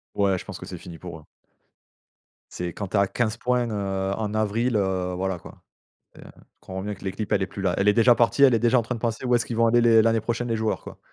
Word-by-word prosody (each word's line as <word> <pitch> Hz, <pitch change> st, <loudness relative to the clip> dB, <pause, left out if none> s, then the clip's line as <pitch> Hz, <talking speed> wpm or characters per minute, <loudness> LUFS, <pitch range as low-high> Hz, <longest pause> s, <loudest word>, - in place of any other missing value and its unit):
Ouais, 100 Hz, -2 st, +2 dB
je -, -, -8 dB
pense -, -, -7 dB
que -, -, -8 dB
c'est -, -, -8 dB
fini 85 Hz, -2 st, -10 dB
pour 85 Hz, -2 st, -9 dB
eux. 75 Hz, -, -20 dB, 1.3 s
C'est 90 Hz, -1 st, -5 dB
quand 100 Hz, -, -5 dB
tu 105 Hz, -, 0 dB
es -, -, +4 dB
à 100 Hz, -, +3 dB
15 115 Hz, 0 st, -1 dB
points, 125 Hz, 0 st, 0 dB
heu, 95 Hz, -2 st, -2 dB
en 105 Hz, -1 st, -3 dB
avril, 110 Hz, +2 st, 0 dB
heu, 95 Hz, -2 st, -1 dB
voilà 95 Hz, 0 st, -2 dB
quoi. -, -, -14 dB, 0.5 s
Et -, -, -14 dB
tu -, -, -13 dB, 0.3 s
comprends 95 Hz, 0 st, -7 dB
bien 105 Hz, 0 st, -4 dB
que 100 Hz, -, -16 dB
l'équipe 105 Hz, +2 st, -4 dB
elle 100 Hz, -, +2 dB
est -, -, 0 dB
plus 100 Hz, -, -8 dB
là. 90 Hz, -2 st, +1 dB
Elle 100 Hz, +1 st, +2 dB
est -, -, +6 dB
déjà 120 Hz, +2 st, +5 dB
partie, 120 Hz, +4 st, +2 dB
elle 130 Hz, -3 st, +6 dB
est -, -, +3 dB
déjà 120 Hz, +2 st, +3 dB
en -, -, +1 dB
train 125 Hz, +3 st, -4 dB
de 115 Hz, -, -7 dB
penser 115 Hz, +1 st, -2 dB
où 125 Hz, -1 st, +2 dB
est-ce 120 Hz, -, +1 dB
qu'ils 115 Hz, -, -4 dB
vont 115 Hz, 0 st, +4 dB
aller 120 Hz, +1 st, +4 dB
les 115 Hz, -1 st, +5 dB
l'année 115 Hz, 0 st, +2 dB
prochaine 120 Hz, +2 st, -3 dB
les 115 Hz, -, 0 dB
joueurs, 110 Hz, 0 st, -1 dB
quoi. -, -, -11 dB
110 Hz, 285 wpm, -24 LUFS, 95-115 Hz, 1.3 s, est